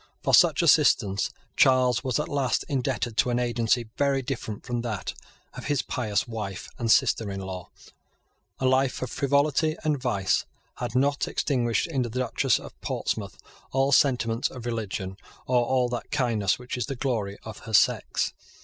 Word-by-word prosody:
For -, -, 0 dB
such -, -, +6 dB
assistance 100 Hz, 0 st, +4 dB, 0.3 s
Charles 125 Hz, -2 st, +4 dB
was 130 Hz, +1 st, 0 dB
at 150 Hz, -, -2 dB
last 140 Hz, -5 st, 0 dB
indebted 130 Hz, -4 st, -2 dB
to 125 Hz, -, +3 dB
an 120 Hz, -, +1 dB
agency 120 Hz, -1 st, +1 dB
very 140 Hz, -1 st, +1 dB
different 115 Hz, -5 st, -5 dB
from 120 Hz, -1 st, -2 dB
that 110 Hz, -6 st, -4 dB, 0.4 s
of -, -, -8 dB
his 145 Hz, -3 st, 0 dB
pious 105 Hz, -4 st, -1 dB
wife 105 Hz, -5 st, -5 dB
and 115 Hz, -2 st, +1 dB
sister 115 Hz, -3 st, +3 dB
in 95 Hz, 0 st, -4 dB
law. 95 Hz, -2 st, -6 dB, 0.9 s
A 130 Hz, -, -2 dB
life 130 Hz, 0 st, +2 dB
of 130 Hz, -, -5 dB
frivolty 145 Hz, +3 st, +1 dB
and 150 Hz, -4 st, 0 dB
vice 100 Hz, -7 st, +1 dB, 0.3 s
had -, -, -4 dB
not 140 Hz, +2 st, +2 dB
extinguished 120 Hz, -6 st, 0 dB
in 145 Hz, -6 st, -1 dB
the 120 Hz, -, -2 dB
Duchess 125 Hz, +1 st, +1 dB
of -, -, -12 dB
Portsmouth -, -, -3 dB, 0.3 s
all 135 Hz, +1 st, +2 dB
sentiments 125 Hz, -5 st, +3 dB
of 125 Hz, -3 st, -9 dB
religion, 100 Hz, -5 st, -4 dB, 0.3 s
or 125 Hz, -1 st, +3 dB
all 125 Hz, 0 st, +2 dB
that 120 Hz, -1 st, -4 dB
kindness 115 Hz, -9 st, +1 dB
which 125 Hz, 0 st, -6 dB
is 125 Hz, -, -2 dB
the 135 Hz, -, -3 dB
glory 115 Hz, -7 st, -2 dB
of 110 Hz, -1 st, -8 dB
her -, -, -7 dB
sex. -, -, +2 dB
125 Hz, 165 wpm, -26 LUFS, 110-135 Hz, 0.9 s, such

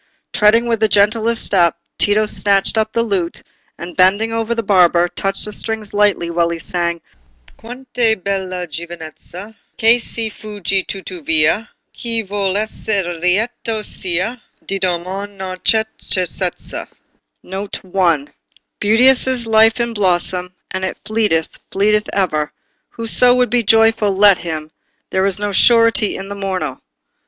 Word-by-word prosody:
Treading 215 Hz, +3 st, +3 dB
with 230 Hz, -2 st, -1 dB
the 220 Hz, -, +3 dB
gentlest 220 Hz, +3 st, +2 dB
step, 175 Hz, -3 st, +2 dB, 0.2 s
Tito 210 Hz, +1 st, +3 dB
snatched 200 Hz, -1 st, +4 dB
up 220 Hz, 0 st, 0 dB
the 230 Hz, -, 0 dB
lute, 190 Hz, -6 st, -2 dB, 0.3 s
and 175 Hz, +1 st, -9 dB
bending 200 Hz, +5 st, +2 dB
over 225 Hz, +1 st, -2 dB
the 230 Hz, -, -2 dB
barber, 175 Hz, -3 st, +3 dB
touched 195 Hz, +2 st, -3 dB
the 210 Hz, -, -3 dB
strings 220 Hz, 0 st, -2 dB
lightly 205 Hz, -4 st, +1 dB
while 170 Hz, 0 st, +1 dB
he 170 Hz, -, -3 dB
sang— 170 Hz, 0 st, -2 dB, 0.5 s
"Quant' 250 Hz, +3 st, -12 dB
è 230 Hz, -3 st, +3 dB
bella 185 Hz, -2 st, -2 dB
giovinezza, 170 Hz, +4 st, -9 dB, 0.2 s
Che 230 Hz, +2 st, +4 dB
si 225 Hz, -1 st, -2 dB
fugge 200 Hz, -3 st, -3 dB
tuttavia! 175 Hz, +1 st, 0 dB, 0.3 s
Chi 230 Hz, -1 st, -3 dB
vuol 195 Hz, -1 st, -2 dB
esser 205 Hz, -4 st, +1 dB
lieto 215 Hz, +4 st, 0 dB
sia, 190 Hz, +7 st, -1 dB, 0.2 s
Di 195 Hz, 0 st, -4 dB
doman 190 Hz, +3 st, -4 dB
non 185 Hz, -1 st, -6 dB
c'è 220 Hz, -1 st, +4 dB, 0.2 s
certezza." 180 Hz, -1 st, 0 dB, 1.9 s
"Beauteous 245 Hz, +6 st, +4 dB
is 255 Hz, -2 st, 0 dB
life 225 Hz, +1 st, +4 dB
in 235 Hz, -1 st, -1 dB
blossom! 180 Hz, -2 st, -1 dB, 0.2 s
And 190 Hz, 0 st, -4 dB
it 190 Hz, -, -3 dB
fleeteth—fleeteth 210 Hz, +1 st, 0 dB
ever; 155 Hz, -6 st, -1 dB, 0.4 s
Whoso 245 Hz, +2 st, +2 dB
would 250 Hz, -1 st, +1 dB
be 245 Hz, -1 st, +2 dB
joyful—let 210 Hz, -3 st, +3 dB
him! 155 Hz, -2 st, -6 dB, 0.4 s
There's 190 Hz, +1 st, 0 dB
no 205 Hz, 0 st, -2 dB
surety 230 Hz, 0 st, +3 dB
for -, -, -6 dB
the 200 Hz, +1 st, -7 dB
morrow." 185 Hz, -9 st, -4 dB
200 Hz, 130 wpm, -17 LUFS, 180-225 Hz, 1.9 s, snatched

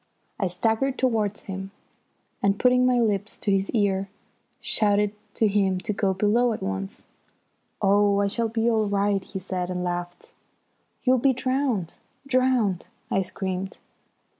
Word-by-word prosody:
I 195 Hz, -, +1 dB
staggered 225 Hz, +9 st, 0 dB
towards 220 Hz, -5 st, 0 dB
him, 195 Hz, 0 st, -6 dB, 0.7 s
and, 200 Hz, 0 st, +2 dB
putting 250 Hz, 0 st, +4 dB
my 250 Hz, -1 st, +3 dB
lips 210 Hz, -3 st, 0 dB
to 205 Hz, -, -1 dB
his 195 Hz, 0 st, +1 dB
ear, 195 Hz, -3 st, +1 dB, 0.5 s
shouted 205 Hz, -1 st, +1 dB, 0.2 s
to 220 Hz, -, +3 dB
him 195 Hz, -2 st, +2 dB
to 210 Hz, +1 st, -2 dB
go 195 Hz, -1 st, +1 dB
below 215 Hz, +5 st, +2 dB
at -, -, -6 dB
once. 95 Hz, 0 st, -4 dB, 0.8 s
"Oh, 200 Hz, 0 st, +4 dB
I 200 Hz, -, +2 dB
shall 230 Hz, +2 st, -1 dB
be 225 Hz, +1 st, 0 dB
all 220 Hz, -2 st, +2 dB
right!" 200 Hz, -1 st, +1 dB
he 190 Hz, -, -7 dB
said, 185 Hz, -1 st, -3 dB
and 180 Hz, -1 st, -2 dB
laughed. 175 Hz, 0 st, -4 dB, 0.7 s
"You'll 255 Hz, 0 st, +4 dB
be 265 Hz, +2 st, +3 dB
drowned 255 Hz, -, -1 dB, 0.3 s
drowned," 255 Hz, -8 st, +2 dB, 0.2 s
I 195 Hz, -, +2 dB
screamed. 190 Hz, 0 st, -4 dB
205 Hz, 145 wpm, -25 LUFS, 190-235 Hz, 0.8 s, putting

